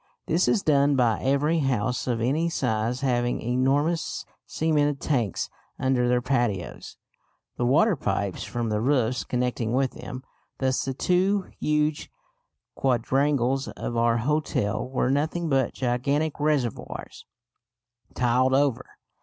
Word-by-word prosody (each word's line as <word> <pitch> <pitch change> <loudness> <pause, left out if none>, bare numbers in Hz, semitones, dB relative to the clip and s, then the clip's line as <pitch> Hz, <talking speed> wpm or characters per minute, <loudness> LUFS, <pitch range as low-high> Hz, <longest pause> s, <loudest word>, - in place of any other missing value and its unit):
This 165 +3 +1
is 210 - +2
done 145 -1 +3
by 120 -4 +2
every 145 +5 +2
house 125 -3 -1
of 120 -2 0
any 150 +8 +1
size 120 -3 -1
having 120 -2 0
enormous 135 +7 0 0.2
cemented 150 -3 +1
tanks 120 - -1 0.3
under 130 -2 +1
their 125 0 +2
patios, 120 -8 -2 0.6
the 120 - 0
water 185 - +4
pipes 100 - -2
from 120 -2 -3
the 105 0 0
roofs 125 -2 +1
connecting 125 -2 -1
with 130 0 +1
them. 130 +1 -8 0.3
Thus 130 -1 0
the 135 -1 -3
two 185 +5 +1
huge 150 0 0 0.6
quadrangles 135 +1 +1
of 120 - -5
our 115 0 +3
hotel 125 -4 -1
were 130 0 0
nothing 160 +4 0
but 135 -3 +1
gigantic 140 +5 0
reservoirs 145 -6 -2 0.9
tiled 125 +2 +2
over. 140 -3 +2
130 Hz, 125 wpm, -25 LUFS, 120-145 Hz, 0.9 s, water